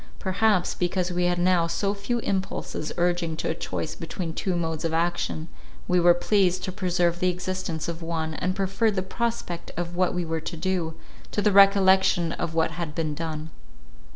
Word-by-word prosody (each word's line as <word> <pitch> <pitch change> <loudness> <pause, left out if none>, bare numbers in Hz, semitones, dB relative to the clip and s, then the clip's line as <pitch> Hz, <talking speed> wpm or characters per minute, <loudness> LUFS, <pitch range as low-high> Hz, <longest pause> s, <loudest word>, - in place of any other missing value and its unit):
Perhaps, 195 -1 +1
because 180 0 -1
we 180 0 +1
had 175 0 +1
now 175 -1 +3
so 200 +4 0
few 205 +4 -2
impulses 190 -6 -3
urging 175 -2 0
to - - -2
a - - +1
choice 160 -1 -4
between 165 0 -5
two 185 +1 -1
modes 165 -2 -2
of 165 -1 0
action, 165 -1 -1 0.4
we 180 0 +3
were 175 0 +6
pleased 185 -1 +2
to 185 - -2
preserve 175 -2 0
the 185 - +3
existence 180 -2 -3
of 170 0 -4
one, 165 -1 -2
and 185 +4 -2
preferred 195 +3 +1
the 185 - 0
prospect 225 -5 -3
of 175 0 -3
what 180 0 +1
we 180 -1 -1
were 160 0 -2
to 165 +1 -5
do, 170 -2 -1 0.3
to - - -2
the 205 0 +3
recollection 190 -3 +5
of 165 -1 -3
what 165 0 +2
had 160 -2 -5
been 155 -2 -1
done. 155 0 -5
175 Hz, 185 wpm, -26 LUFS, 165-190 Hz, 0.4 s, were